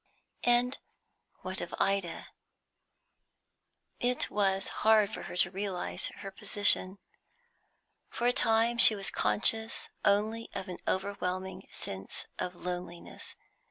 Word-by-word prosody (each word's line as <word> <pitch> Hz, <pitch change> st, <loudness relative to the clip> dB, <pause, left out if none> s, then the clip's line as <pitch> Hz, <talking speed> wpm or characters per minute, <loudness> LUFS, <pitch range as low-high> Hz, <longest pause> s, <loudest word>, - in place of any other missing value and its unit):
And 245 Hz, +2 st, +3 dB, 0.6 s
what -, -, -3 dB
of -, -, -6 dB
Ida? 195 Hz, -4 st, -1 dB, 1.7 s
It 245 Hz, 0 st, +1 dB
was 195 Hz, -2 st, +1 dB
hard 215 Hz, -2 st, +4 dB
for -, -, -5 dB
her -, -, -6 dB
to 175 Hz, -, +2 dB
realise 195 Hz, -2 st, -3 dB
her 195 Hz, -, -7 dB
position; 195 Hz, -1 st, +3 dB, 1.1 s
for 240 Hz, -, -4 dB
a 245 Hz, -, +4 dB
time 230 Hz, +1 st, +2 dB
she 220 Hz, -, +10 dB
was 195 Hz, -1 st, -5 dB
conscious 220 Hz, +1 st, +2 dB
only 215 Hz, +3 st, +1 dB
of 195 Hz, 0 st, -5 dB
an 180 Hz, -, -6 dB
overwhelming 190 Hz, -1 st, -3 dB
sense 95 Hz, 0 st, -5 dB
of 180 Hz, -, -3 dB
loneliness. 175 Hz, -1 st, -6 dB
200 Hz, 115 wpm, -30 LUFS, 185-220 Hz, 1.7 s, she